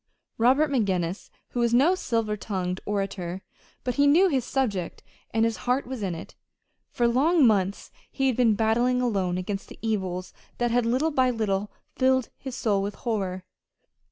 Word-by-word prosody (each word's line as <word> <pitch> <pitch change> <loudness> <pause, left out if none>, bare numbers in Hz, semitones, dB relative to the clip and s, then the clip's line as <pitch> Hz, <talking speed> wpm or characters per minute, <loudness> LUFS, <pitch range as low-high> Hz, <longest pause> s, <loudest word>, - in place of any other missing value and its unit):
Robert 270 +6 +4
McGinnis 190 -7 -1 0.2
was 235 -1 +2
no 290 +9 +5
silver 225 -11 -1
tongued 185 -3 -3
orator, 195 -3 -3 0.4
but 250 +1 -2
he 285 0 +5
knew 350 +7 +5
his 265 -6 +1
subject, 210 -10 -2 0.3
and 225 0 +2
his 230 -1 -1
heart 255 +3 +2
was 255 -2 -6
in 185 -4 -2
it. 165 - -9 0.6
For 240 - +1
long 285 +6 +4
months 200 -3 +1 0.2
he 270 - -1
had 260 -3 +2
been 230 -3 +3
battling 240 +3 +2
alone 195 -7 0
against 195 +2 -4
the - - -11
evils 190 -5 -2 0.2
that 240 -1 0
had 240 -1 +2
little 265 +7 +1
by 260 -3 +3
little 210 -4 -1 0.3
filled 260 -1 +2
his 265 -2 -6
soul 205 -5 +1
with 200 +1 -3
horror. 190 -6 -3
225 Hz, 165 wpm, -26 LUFS, 195-255 Hz, 0.6 s, no